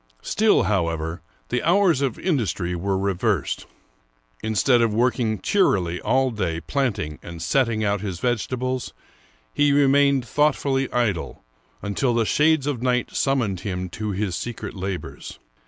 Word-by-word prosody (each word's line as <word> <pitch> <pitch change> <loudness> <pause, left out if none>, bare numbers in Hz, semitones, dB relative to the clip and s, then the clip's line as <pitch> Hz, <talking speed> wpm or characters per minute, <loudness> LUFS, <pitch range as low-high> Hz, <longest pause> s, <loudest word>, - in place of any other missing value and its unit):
Still, 220 0 +3
however, 85 -4 -1 0.3
the 125 - 0
hours 175 -5 +3
of 135 -5 -1
industry 105 - -1
were 95 +3 -1
reversed. 100 - -1 0.7
Instead 115 +3 +2
of 115 -2 +2
working 115 -1 +1
cheerily 90 - +1
all 130 0 +2
day, 90 -7 -2
planting 100 - -2
and 85 -1 -9
setting 115 - +1
out 100 -1 0
his 95 -4 -4
vegetables, 125 +2 -2 0.6
he 145 0 +3
remained 140 -2 +4
thoughtfully 135 0 +1
idle, 110 - -1 0.4
until 115 +5 0
the 115 -1 +2
shades 150 +3 +3
of 140 -5 -2
night 125 -1 0
summoned 120 -9 0
him 90 -1 -4
to 105 +5 -4
his 100 -2 -2
secret 120 +4 -5
labors. 95 -1 -6
115 Hz, 135 wpm, -23 LUFS, 95-135 Hz, 0.7 s, remained